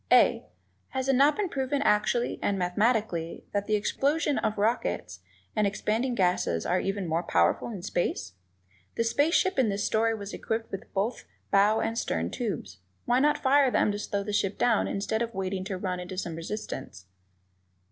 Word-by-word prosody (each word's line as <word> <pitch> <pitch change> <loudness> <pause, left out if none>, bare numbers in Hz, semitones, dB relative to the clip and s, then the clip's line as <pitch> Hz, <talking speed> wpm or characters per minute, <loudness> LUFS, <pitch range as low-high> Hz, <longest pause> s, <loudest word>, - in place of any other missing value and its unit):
(a) - - +5 0.4
Has 265 0 -3
it 270 - +4
not 280 +4 +5
been 415 -2 0
proven 275 -2 -1
actually 220 +2 +1
and 200 - 0
mathematically 180 -2 0
that 205 0 -1
the 215 - +2
explosions 285 +8 +1
of 215 - -1
rockets 90 - -1 0.4
and 210 -1 +3
expanding 225 +5 -1
gases 180 - +1
are 180 +1 +2
even 195 -1 -2
more 165 +1 0
powerful 85 - +1
in 200 -6 -7
space? 175 - -2 0.6
The 230 - +1
space 285 +8 +2
ship 375 -7 +2
in 245 -5 +3
this 200 0 -1
story 225 +1 +2
was 200 -1 -7
equipped 225 0 -3
with 195 - -7
both 210 +5 -1 0.3
bow 205 +2 +4
and 225 - -1
stern 85 - -1
tubes; 200 - -4 0.3
why 245 +1 +3
not 295 +2 +3
fire 275 0 +4
them 215 - +2
to 205 - -4
slow 200 -1 -2
the 210 +1 -4
ship 200 -1 0
down 230 -3 +2
instead 215 +3 -1
of 230 -2 -3
waiting 190 0 -2
to 190 -2 -3
run 185 -1 -3
into 180 +1 -7
some 175 -3 -3
resistance? 165 - -6
210 Hz, 180 wpm, -28 LUFS, 185-240 Hz, 0.6 s, a